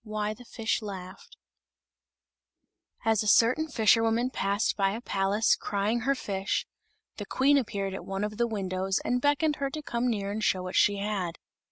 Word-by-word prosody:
WHY 215 -1 -2
THE 245 +3 -14
FISH 225 0 -2
LAUGHED 200 - -9 1.7
As 220 -2 +3
a 215 - -3
certain 245 +9 +4
fisherwoman 225 -1 +3
passed 200 0 0
by 195 -2 +1
a 225 - -4
palace 200 +1 +2
crying 205 +4 -1
her 275 +4 +1
fish, 195 -5 -2 0.5
the - - -5
Queen 275 +2 +3
appeared 200 -7 -1
at 190 - -6
one 195 +1 -3
of 210 0 -3
the 235 - +2
windows 190 -3 -1
and 250 +1 +1
beckoned 295 +2 +2
her 280 -1 -1
to 305 +2 -6
come 240 -2 -1
near 200 -3 -2
and 215 +1 -3
show 185 -2 +1
what 185 0 -5
she 205 -1 +4
had. 195 -4 -3
215 Hz, 175 wpm, -28 LUFS, 195-245 Hz, 1.7 s, certain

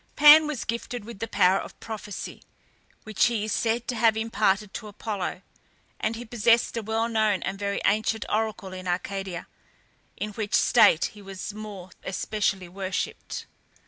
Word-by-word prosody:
Pan 300 +1 +9
was 300 -6 -3
gifted 235 -1 -4
with 230 -3 -9
the 225 - -3
power 185 -2 +4
of - - -9
prophecy, 210 -2 -7 0.6
which 215 -2 +2
he 235 -3 0
is 215 - -3
said 230 +2 0
to 245 - -1
have 220 -1 +3
imparted 210 -3 +1
to 215 - -6
Apollo, 205 -2 -4 0.6
and 220 +1 -1
he 240 +2 -7
possessed 230 0 +3
a 230 - -1
well 220 +1 0
known 215 -4 +1
and 195 0 -3
very 200 0 -1
ancient 215 +1 +1
oracle 215 -3 -2
in 185 0 -7
Arcadia, 180 0 -3 0.7
in 210 - -3
which 210 0 -2
state 175 -9 +5
he 210 - -13
was 195 +1 -7
more 205 -4 -8
especially 195 -1 -1
worshipped. 185 +1 -4
215 Hz, 160 wpm, -26 LUFS, 195-225 Hz, 0.7 s, Pan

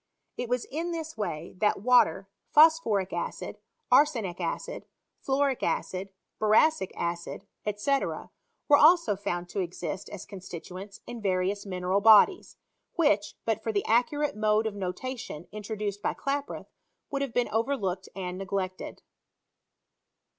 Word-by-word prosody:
It 245 - -4
was 250 -1 0
in 325 +5 -4
this 320 -2 -5
way 170 -6 -4
that 210 -2 +1
water, 215 -7 +4 0.2
phosphoric 295 - +4
acid, 175 - -4 0.3
arsenic 225 -12 +3
acid, 170 - -4 0.4
fluoric 270 -1 +1
acid, 190 +1 -2 0.3
boracic 215 +1 +4
acid, 170 0 -4 0.3
&c., 275 +6 +2
were - - -5 0.5
also 310 - +5
found 175 -3 -3
to 200 - -3
exist 180 0 -4
as 200 - -8
constituents 190 +1 -9
in 240 -1 -7
various 195 +1 0
mineral 185 +1 0
bodies, 220 - +6 0.4
which, 210 -12 +2
but 225 -2 0
for 225 - -2
the 205 -2 -1
accurate 265 +6 +1
mode 215 +1 +2
of 220 - -1
notation 195 - -5
introduced 210 -1 -4
by - - -1
Klaproth, 280 +1 -3 0.5
wouldhavebeen 275 -3 0
overlooked 210 -6 -1
and 185 -1 -5
neglected. 190 -1 -4
210 Hz, 125 wpm, -28 LUFS, 185-255 Hz, 0.5 s, bodies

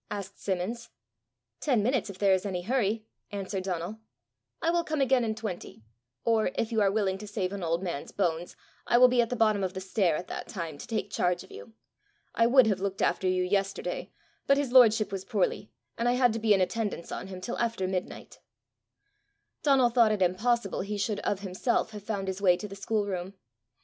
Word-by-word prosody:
asked 200 -2 -6
Simmons. 200 +5 -3 0.7
"Ten 245 -8 +1
minutes, 245 -2 +1
if 195 - -8
there 195 -1 +4
is 185 - +1
any 185 -3 -3
hurry," 220 -1 0 0.3
answered 195 -1 -3
Donal. 185 +3 -3 0.6
"I 330 - +1
will 345 0 +1
come 310 -2 -2
again 265 -2 +3
in 220 -1 -1
twenty; 205 - -6 0.4
or, 225 -2 +3
if 230 - -1
you 220 -2 +2
are 200 - +4
willing 195 -2 0
to 210 - -8
save 200 -2 -2
an 200 - -5
old 170 +1 -1
man's 170 -6 -4
bones, 175 -3 -1 0.3
I 240 - +4
will 250 +1 +8
be 245 -1 +4
at 230 - -1
the 250 - -1
bottom 215 -3 +2
of 185 -1 -2
the - - -3
stair 185 -3 +1
at 175 - -4
that - - -6
time 165 -7 -6
to - - -8
take 225 -3 -3
charge 180 0 0
of - - -17
you. 100 +3 -11 0.6
I 230 - +3
would 260 0 +6
have 205 -4 +1
looked 195 0 -2
after 190 - +1
you 185 0 +2
yesterday, 195 +1 -2 0.4
but 275 - +5
his 285 -3 -1
lordship 225 -4 +6
was 195 -1 -4
poorly, 205 -1 -1 0.3
and 235 +1 +2
I - - +3
had 250 -2 +3
to 225 - -2
be 215 -2 +4
in 190 - +1
attendance 205 -2 -2
on - - -5
him 185 -1 -7
till 235 +6 -5
after 230 -5 0
midnight." 185 -1 -5 1.2
Donal 270 -4 +4
thought 230 -2 +5
it 205 -3 +2
impossible 205 +4 +1
he 205 +2 -3
should 205 0 -1
of 200 -1 -2
himself 200 +4 -1
have 210 -1 -8
found 200 -2 -3
his 190 +1 -3
way 180 -3 +5
to 210 - -6
the 195 - -9
schoolroom. 200 -2 -2
205 Hz, 210 wpm, -28 LUFS, 185-230 Hz, 1.2 s, will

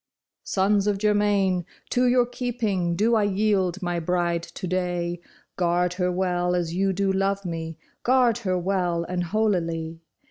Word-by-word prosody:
" - - -64
Sons 200 +1 +2
of 205 -1 +1
Germain, 205 -3 +2 0.3
to 250 +1 +2
your 245 0 +4
keeping 225 -8 -2
do 220 +6 +2
I 220 - +4
yield 195 -2 +1
my 175 -1 -1
bride 170 0 0
to 170 - -8
day. 175 -1 -2 0.4
Guard 175 0 +1
her 180 0 0
well 180 -1 0
as 170 -2 -1
you 195 +2 +1
do 195 +1 0
love 195 +1 0
me; 165 -2 -5 0.2
guard 245 -2 +3
her 185 -5 -1
well 180 -2 0
and 180 +1 -2
holily. 165 -5 -1
185 Hz, 155 wpm, -25 LUFS, 175-205 Hz, 0.4 s, your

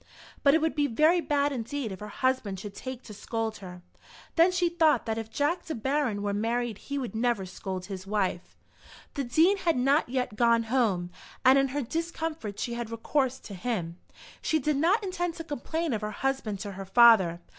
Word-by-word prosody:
But 280 +1 +5
it 320 - +2
would 320 0 +1
be 290 -1 +1
very 310 +8 +3
bad 290 -2 +1
indeed 255 -1 -3
if 190 - -7
her 210 - -7
husband 215 -4 -1
should 205 +1 -7
take 260 +4 -7
to 215 - -10
scold 220 +1 -3
her. 180 -2 -10 0.5
Then 340 +2 +5
she 360 -1 +1
thought 335 -3 +3
that 225 0 -2
if 225 -1 -6
Jack 290 +9 0
De 320 - -4
Baron 250 -3 -1
were 205 0 -1
married 230 +1 -1
he 280 - -5
would 255 -5 -4
never 225 -3 0
scold 185 0 -6
his 190 -1 -7
wife. 195 -4 -2 0.6
The 280 - -2
Dean 320 +11 +3
had 335 -6 +1
not 275 +3 +2
yet 250 -3 -2
gone 235 0 +3
home, 220 -7 0 0.3
and 260 +2 +7
in 270 - +2
her 280 +2 -2
discomfort 320 -6 -4
she 240 - -2
had 235 -1 -4
recourse 260 +3 0
to 205 - -9
him. 180 -4 -3 0.4
She 315 - +1
did 300 0 0
not 370 +9 +3
intend 355 -3 -2
to 330 - -6
complain 320 +1 -3
of 220 - -2
her 210 - -3
husband 220 -2 -2
to 205 - -5
her 195 0 -7
father. 195 -5 +6
245 Hz, 200 wpm, -28 LUFS, 210-295 Hz, 0.6 s, and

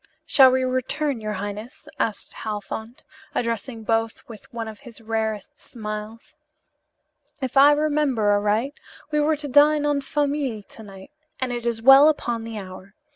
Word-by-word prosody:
"Shall 265 -4 +7
we 260 0 +1
return, 255 +1 -1
your 215 0 -3
highness?" 205 +8 -7
asked 215 -3 -2
Halfont, 220 +2 -6 0.3
addressing 230 0 -3
both 225 0 -1
with 220 -3 -13
one 230 -1 -5
of 215 -1 -9
his 245 -5 -13
rarest 220 -2 -3
smiles. 215 +4 -8 1.0
"If 260 -1 -4
I 280 +2 +7
remember 290 -8 +1
aright, 210 +6 +1 0.4
we 300 - +1
were 305 +1 +2
to 295 0 -6
dine 295 +2 +4
en 290 -1 +1
famille 280 -6 -2
to 220 - -15
night, 195 +2 -12 0.3
and 255 -1 -2
it 240 -1 -4
is 225 -1 -1
well 270 +4 +9
upon 240 -6 -2
the 225 -1 -6
hour. 190 0 -10
235 Hz, 155 wpm, -23 LUFS, 215-280 Hz, 1.0 s, well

